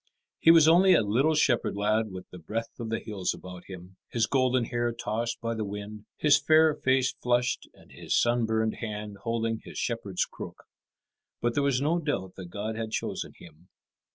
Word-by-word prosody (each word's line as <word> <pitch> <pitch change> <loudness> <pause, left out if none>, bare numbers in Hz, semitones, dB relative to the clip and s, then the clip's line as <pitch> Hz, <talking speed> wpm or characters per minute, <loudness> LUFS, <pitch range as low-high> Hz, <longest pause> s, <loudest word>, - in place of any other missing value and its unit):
He - - +4
was 165 -2 +8
only 185 +3 +6
a - - +3
little 130 +10 +2
shepherd 125 -8 +2
lad 105 +2 +1
with 95 -1 -8
the 90 - -10
breath 115 +7 -5
of 115 -1 -4
the 115 - 0
hills 100 -5 -3
about 90 -1 -10
him, 95 0 -11
his 115 -2 +1
golden 130 -2 +2
hair 120 0 -1
tossed 115 0 -3
by 115 0 -2
the 110 -1 -3
wind, 105 +1 -7
his 145 -1 +5
fair 155 +1 +5
face 130 -2 +1
flushed, 120 0 0
and - - -20
his - - 0
sunburned 110 -2 +1
hand 105 -2 -5
holding 115 0 -1
his - - -10
shepherd's 115 -6 -1
crook. - - -10 0.8
But 120 0 0
there 145 - +1
was 140 -2 +1
no 165 +4 +2
doubt 145 - -3
that 95 -2 -7
God 105 +4 -4
had 110 0 -4
chosen - - -4
him. 85 +2 -16
115 Hz, 185 wpm, -28 LUFS, 105-130 Hz, 0.8 s, was